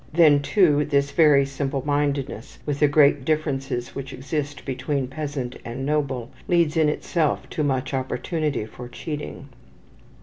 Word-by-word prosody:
Then, 155 -3 +5
too, 150 -3 +3
this 140 -1 +1
very 145 -2 +5
simple 135 0 -3
mindedness, 145 -5 -1
with 145 -1 -2
the 150 - +5
great 145 -1 +4
differences 135 -5 -1
which 135 0 -6
exist 145 +1 -4
between 135 0 -2
peasant 140 -2 -4
and 125 +3 -5
noble, 135 -5 -1 0.2
leads 170 -3 +2
in 160 -2 +4
itself 155 0 -1
to - - -2
much 135 -2 -1
opportunity 145 0 -2
for 120 +3 -10
cheating. 145 0 -6
140 Hz, 140 wpm, -24 LUFS, 135-150 Hz, 0.2 s, Then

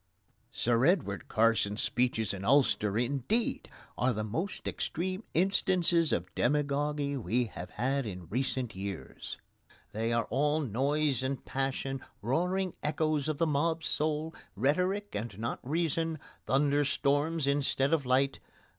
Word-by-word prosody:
Sir 120 +1 +1
Edward 145 - +1
Carson's 110 -2 +2
speeches 120 -5 +1
in 100 -1 -6
Ulster, 110 -4 +3
indeed, 140 - 0 0.3
are 125 0 +3
the 110 0 -2
most 160 - -3
extreme 185 +5 -2
instances 175 -2 +3
of 90 +1 -1
demagogy 145 +1 0
we 120 +2 +1
have 90 -4 -8
had 130 +5 -1
in 90 -3 -6
recent 125 - -2
years. 95 0 -5 0.5
They 115 +2 -1
are 115 -1 +1
all 150 +5 +2
noise 140 +3 +1
and 130 +1 -3
passion, 135 0 -2 0.2
roaring 180 - 0
echoes 155 0 0
of 155 - -1
the 165 - +2
mob 160 +2 +1
soul, 155 +1 0 0.2
rhetoric 180 - +1
and 105 -1 -4
not 115 +2 -3
reason, 165 +2 -1 0.3
thunder 145 +1 +3
storms 145 +3 +1
instead 140 0 +1
of 155 -3 +2
light. 130 +2 +2
140 Hz, 130 wpm, -31 LUFS, 120-155 Hz, 0.5 s, Ulster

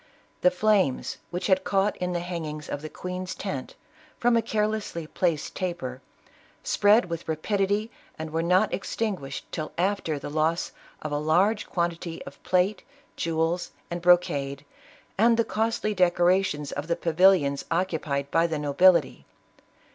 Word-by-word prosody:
The 180 - +6
flames, 190 -6 +1
which 180 +1 -4
had 190 -1 +3
caught 195 +1 +1
in 180 0 -2
the 175 -1 -1
hangings 160 -4 -5
of 145 - -4
the 155 - -6
queen's 180 +2 -5
tent, 140 -10 -5 0.4
from 240 0 +3
a 230 - +4
carelessly 215 -6 -2
placed 165 -1 -1
taper, 170 -9 -4 0.6
spread 210 +3 +4
with 170 -1 -6
rapidity, 200 +7 0 0.3
and 160 0 -6
were 165 +1 0
not 180 +5 +3
ex 190 - -4
tinguished 185 -12 -3
till 155 -1 -4
after 180 -4 0
the 140 +1 -7
loss 160 +2 0 0.3
of 155 - -4
a 145 - 0
large 185 +8 +2
quantity 170 -1 -2
of - - -12
plate, 185 +2 +1 0.3
jewels 165 +2 -1 0.2
and 175 0 -3
brocade, 145 -6 +2 0.5
and 230 +1 +5
the 230 - +2
costly 220 -1 -1
decorations 175 -4 +2
of 145 +2 -4
the 170 - +1
pavilions 165 -5 +3
occupied 160 -5 -1
by 165 +1 +3
the 160 -2 -2
nobility. 150 +2 +3
175 Hz, 145 wpm, -26 LUFS, 155-195 Hz, 0.6 s, The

